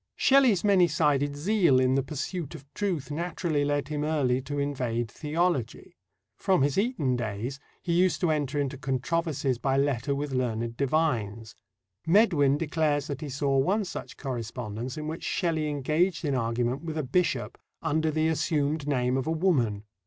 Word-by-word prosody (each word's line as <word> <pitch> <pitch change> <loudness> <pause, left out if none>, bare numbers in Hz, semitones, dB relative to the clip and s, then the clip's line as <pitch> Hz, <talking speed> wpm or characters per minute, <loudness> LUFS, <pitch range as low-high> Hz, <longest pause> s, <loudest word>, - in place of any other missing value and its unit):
Shelley's 260 -9 +4
many 195 -4 +5
sided 145 -3 +1
zeal 170 -4 +3
in 130 0 +3
the 135 - +3
pursuit 150 +4 -5
of 140 -3 -11
truth 175 -9 -2
naturally 165 -1 -1
led 145 0 -1
him 150 -1 -2
early 140 -5 +1
to 145 +2 -5
invade 125 -5 -2
theology. 150 - -2 0.4
From 190 -8 +3
his 140 -1 +1
Eton 195 - +1
days, 115 +4 -4 0.2
he 170 - -1
used 180 +2 +3
to 175 -3 +2
enter 145 -2 -1
into 140 -1 -2
controversies 135 -1 -1
by 135 0 +1
letter 140 -1 +1
with 145 0 -3
learned 115 -3 -1
divines. 120 -7 -1 0.5
Medwin 165 -8 +4
declares 150 -2 0
that 140 -3 -5
he 150 - -5
saw 135 +1 0
one 200 +10 +1
such - - -7
correspondence 120 -1 -5
in 155 - -4
which 160 +2 -5
Shelley 160 -4 0
engaged 155 +5 0
in 145 - 0
argument 120 +1 -1
with 160 -1 -5
a 155 - 0
bishop 170 +7 0 0.2
"under 160 0 +1
the 155 +1 +1
assumed 155 -2 0
name 125 -2 +1
of 135 - -2
a - - +1
woman." 135 - +1
145 Hz, 165 wpm, -27 LUFS, 130-160 Hz, 0.5 s, many